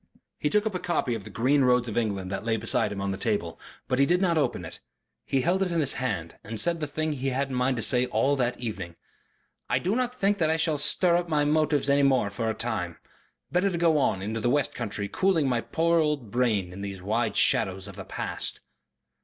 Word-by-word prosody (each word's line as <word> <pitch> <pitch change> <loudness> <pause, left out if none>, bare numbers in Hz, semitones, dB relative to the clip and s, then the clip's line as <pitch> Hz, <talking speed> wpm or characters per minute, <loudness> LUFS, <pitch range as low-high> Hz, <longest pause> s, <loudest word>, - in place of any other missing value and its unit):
He 150 - 0
took 210 +4 +2
up 220 - -1
a 180 - -2
copy 155 -9 -1
of 110 -4 -5
THE - - -8
GREEN 130 +7 +2
ROADS 125 -1 +3
OF 110 - -5
ENGLAND 100 -5 -1
that 95 +1 -3
lay 115 0 0
beside 105 - +1
him 100 - -5
on 100 0 -1
the 95 - -5
table. 100 -7 -2 0.3
But 130 - 0
he 140 - +4
did 175 +1 +3
not 180 -3 +2
open 130 - 0
it. - - -9 0.5
He 135 - +1
held 180 +6 +1
it 185 -2 0
in 170 - +1
his 140 -4 +2
hand 100 -11 -4
and 110 0 -6
said 170 +8 +1
the 150 - -2
thing 155 +1 -2
he 135 -1 -3
had 130 - -1
had 140 0 -1
in - - -3
mind 125 +1 +1
to 115 - -1
say 125 +4 +3
all 140 +3 +1
that 125 -1 -1
evening. 100 -8 -5 0.7
"I - - +2
do 190 +5 -1
not 250 0 -1
think 205 -3 +1
that 160 -2 +2
I 160 - +2
shall 160 -2 0
stir 175 +3 +4
up 175 -1 -3
my 150 -2 +2
motives 150 -1 +2
any 140 0 +4
more 130 -7 +2
for 115 +2 -2
a 110 - -2
time. 90 -8 -3 0.5
Better 180 +3 +2
to 175 - -3
go 165 -3 +3
on 95 -8 0
into 110 +3 -3
the 120 - 0
west 145 +2 +1
country 105 -4 -4
cooling 165 - +1
my 120 -2 +1
poor 170 +5 +1
old 150 -8 -1
brain 105 -7 0
in 100 - -8
these 100 -1 -5
wide 110 +3 -1
shadows 95 +1 +2
of 100 - -10
the 95 - -7
past." - - -4
125 Hz, 250 wpm, -27 LUFS, 105-155 Hz, 0.7 s, he